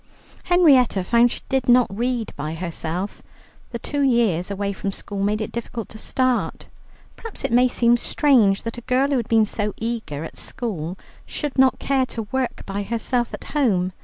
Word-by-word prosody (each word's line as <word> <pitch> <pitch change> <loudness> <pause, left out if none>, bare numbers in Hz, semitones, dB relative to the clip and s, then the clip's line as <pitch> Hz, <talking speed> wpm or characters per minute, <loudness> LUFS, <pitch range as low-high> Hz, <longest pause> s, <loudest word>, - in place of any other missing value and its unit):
Henrietta 275 - +4
found 235 +5 +4
she - - -6
did 265 -2 0
not 245 0 +6
read 240 0 -1
by 155 +2 -4
herself. 170 +2 -4 0.5
The 235 - -4
two 285 +5 -3
years 230 -10 +2
away 200 0 -2
from 195 +1 -3
school 200 0 -6
made 210 +2 0
it 215 - -4
difficult 235 -1 -5
to 220 - -10
start. 255 0 -1 0.5
Perhaps 455 -2 -8
it - - -1
may 250 +2 +5
seem 240 -1 +3
strange 235 -7 +3
that 230 +1 -5
a 240 - -18
girl 260 +2 +3
who 280 - +2
had 235 -2 -2
been 225 -1 +5
so 210 -1 -3
eager 225 -10 -4
at 165 - -9
school, 185 -7 -4 0.3
should 295 -3 -4
not 265 -1 +4
care 265 -2 +1
to 225 - -5
work 260 -2 -2
by 200 +1 -3
herself 235 +3 -1
at - - -7
home. 190 -11 +1
230 Hz, 185 wpm, -22 LUFS, 200-255 Hz, 0.5 s, not